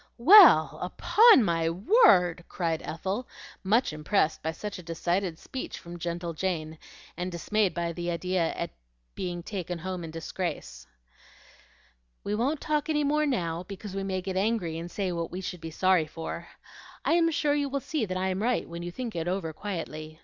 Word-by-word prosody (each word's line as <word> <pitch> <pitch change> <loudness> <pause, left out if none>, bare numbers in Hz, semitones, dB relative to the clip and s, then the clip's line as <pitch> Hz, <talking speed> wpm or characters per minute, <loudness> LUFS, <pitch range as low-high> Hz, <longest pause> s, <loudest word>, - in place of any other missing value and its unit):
"Well, 365 - +8
upon 445 - +5
my 165 -4 +1
word!" 180 - +4
cried 165 -3 -2
Ethel, 190 +9 -4 0.4
much 215 -1 +2
impressed 155 +2 0
by 160 - -2
such 200 +4 -6
a - - -7
decided 175 +1 -2
speech 260 - -6
from 170 0 -10
gentle 170 0 -3
Jane, 160 -2 -3 0.4
and 180 +2 -4
dismayed 195 +3 0
at 170 -1 -2
the 175 0 -3
idea 175 0 0
of - - -3 0.4
being 175 -2 -4
taken 180 -3 -4
home 180 +1 -5
in 165 - -6
disgrace. 160 - -5 1.4
"We 205 - -2
won't 265 +8 0
talk 300 0 -1
any 300 -1 +1
more 300 +1 +2
now, 170 - -1
because 195 +2 -8
we 195 - -3
may 190 -1 -2
get 190 0 -3
angry 190 -6 0
and 170 +1 -6
say 190 0 -2
what 170 -1 -3
we 180 - -6
should 180 -2 -6
be 165 - -6
sorry 180 0 +2
for. 165 +2 -6 0.6
I - - +3
am 335 -1 +4
sure 295 -2 +1
you 290 -1 0
will 280 +1 -1
see 300 0 -2
that 185 0 -3
I 190 +1 0
am 185 +1 -2
right 245 +2 0
when 170 0 -7
you 175 - -4
think 230 +4 -6
it 165 0 -2
over 180 -3 -2
quietly. 155 -4 -6
180 Hz, 185 wpm, -28 LUFS, 170-215 Hz, 1.4 s, Well